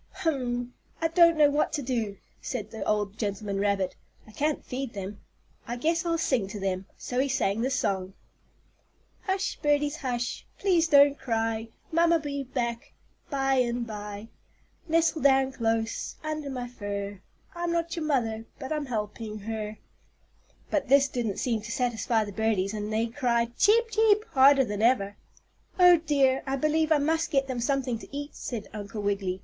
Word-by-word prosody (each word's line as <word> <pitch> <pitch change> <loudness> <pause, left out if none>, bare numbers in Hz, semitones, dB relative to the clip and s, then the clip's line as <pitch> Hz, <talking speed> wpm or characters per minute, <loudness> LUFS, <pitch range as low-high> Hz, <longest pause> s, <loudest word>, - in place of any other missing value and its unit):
"Hum! 245 -5 -1 0.3
I 325 - +1
don't 335 -1 +5
know 295 -1 +6
what 295 +1 +1
to 290 - -1
do," 230 -6 -2 0.2
said 215 -5 -4
the 220 - -5
old 210 0 -1
gentleman 200 -1 -2
rabbit. 200 -2 0 0.3
"I 215 - -15
can't 295 +7 -1
feed 255 -1 -4
them. 200 0 -6 0.5
I 240 - -3
guess 330 +7 0
I'll 335 0 +1
sing 260 -10 +1
to 205 +2 -6
them." 190 0 -2
So 245 - -3
he 275 +1 +2
sang 220 -5 +1
this 260 +2 0
song: 190 -3 -1 1.1
"Hush, 385 0 -1
birdies, 295 0 +2
hush, 245 -4 -3
Please 350 -4 +3
don't 285 -2 +6
cry; 225 -1 -1 0.2
Mamma'll 335 +1 +4
be 285 -3 -4
back 240 -3 -3 0.4
By 270 -2 +1
and 240 -1 +1
by. 210 0 -7 0.6
"Nestle 325 -1 +2
down 270 -1 +4
close 225 -2 -1
Under 310 -2 -3
my 250 -2 -4
fur, 200 -4 -5 0.3
I'm 345 -1 -2
not 335 +1 -1
your 325 -2 -3
mother, 225 -6 0
but 265 - -7
I'm 300 -2 -2
helping 215 -1 -4
her." 215 0 -4 0.9
But 290 -3 0
this 275 +1 +5
didn't 230 -5 -2
seem 230 -4 0
to 215 +2 -7
satisfy 230 -3 0
the 205 - -7
birdies 210 -2 0
and 210 0 -4
they 220 +1 +1
cried 235 -1 0
"cheep 455 +2 +4
cheep" 430 -1 +4
harder 275 0 +6
than 205 -2 -3
ever. 215 -4 +2 0.6
"Oh, 360 -1 +8
dear! 280 -5 +2
I 270 - 0
believe 310 +3 +1
I 310 - +6
must 320 +3 +1
get 275 -4 +2
them 260 -2 -4
something 255 -2 0
to - - -11
eat," 285 +1 -5
said 230 -4 -5
Uncle 205 0 -6
Wiggily. 195 -2 -1
250 Hz, 170 wpm, -27 LUFS, 215-295 Hz, 1.1 s, Oh